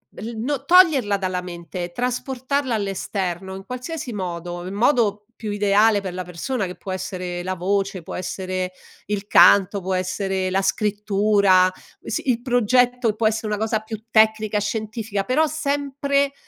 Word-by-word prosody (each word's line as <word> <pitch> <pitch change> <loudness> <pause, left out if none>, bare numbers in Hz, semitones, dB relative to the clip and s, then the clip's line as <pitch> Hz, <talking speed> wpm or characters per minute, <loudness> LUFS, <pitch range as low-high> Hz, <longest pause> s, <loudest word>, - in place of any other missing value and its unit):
l 225 - -6
no 255 +5 -3
toglierla 315 - +5
dalla 185 -2 -2
mente, 175 0 -6
trasportarla 260 +2 -2
all'esterno, 190 -2 -3
in 195 - -8
qualsiasi 255 - -6
modo, 175 -3 -5
in 190 - -6
modo 210 -2 +2
più 220 -2 -7
ideale 205 +1 +3
per 190 -2 -5
la 185 0 -5
persona 195 +7 -3
che 180 0 -6
può 190 - -7
essere 180 -1 -4
la 185 +1 -3
voce, 195 0 -1
può - - -7
essere 185 0 -3 0.3
il 205 0 -3
canto, 200 -1 +6
può 190 0 -3
essere 185 +1 -1
la 190 +1 +1
scrittura, 200 -2 +3 0.3
sì - - -3
il 235 -1 -2
progetto 245 0 +2
e 215 - +1
può 220 0 +2
esse 220 +1 -1
una 210 0 -1
cosa 220 +1 0
più 220 0 -8
tecnica, 220 -1 +3
scientifica, 215 -1 -3
però 290 +9 +2
sempre 280 -2 0
205 Hz, 155 wpm, -22 LUFS, 185-240 Hz, 0.3 s, canto